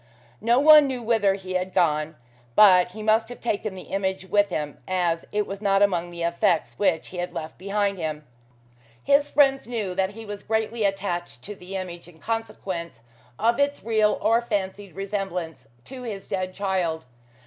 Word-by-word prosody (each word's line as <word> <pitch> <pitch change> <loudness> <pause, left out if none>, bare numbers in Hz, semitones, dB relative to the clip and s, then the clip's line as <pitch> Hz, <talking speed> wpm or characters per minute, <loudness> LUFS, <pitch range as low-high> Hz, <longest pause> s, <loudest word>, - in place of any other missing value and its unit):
No 235 +3 +3
one 300 +1 +8
knew 255 -3 -4
whither 220 -4 +2
he 185 -1 -7
had 185 0 -2
gone, 155 -3 +1 0.4
but 180 -3 +6
he 215 +1 -7
must 220 +1 +2
have 245 - -9
taken 215 -3 -2
the 185 - -8
image 190 -1 -1
with 205 +1 +2
him, 150 -4 -4
as 175 -3 0
it 210 0 0
was 195 +1 -7
not 200 -1 +3
among 175 -3 +1
the 170 -1 -6
effects 170 -1 +1
which 185 -6 +1
he 180 - -9
had 175 0 -4
left 155 - -6
behind 200 0 -1
him. 155 -2 -4 0.8
His 285 +1 +3
friends 270 -3 +3
knew 220 -6 -3
that 190 +1 0
he 225 0 -9
was 205 -1 -7
greatly 220 0 -1
attached 195 -3 -3
to 210 - -6
the 190 0 -9
image, 175 -3 -6
in 175 -2 -16
consequence 190 - -4 0.4
of 235 +3 +2
its 285 0 0
real 215 -2 +2
or 230 +1 +3
fancied 200 -5 -4
resemblance 195 -4 -4 0.2
to 260 -1 -9
his 210 -5 -6
dead 185 0 -3
child. 185 -6 -1
195 Hz, 180 wpm, -25 LUFS, 180-220 Hz, 0.8 s, one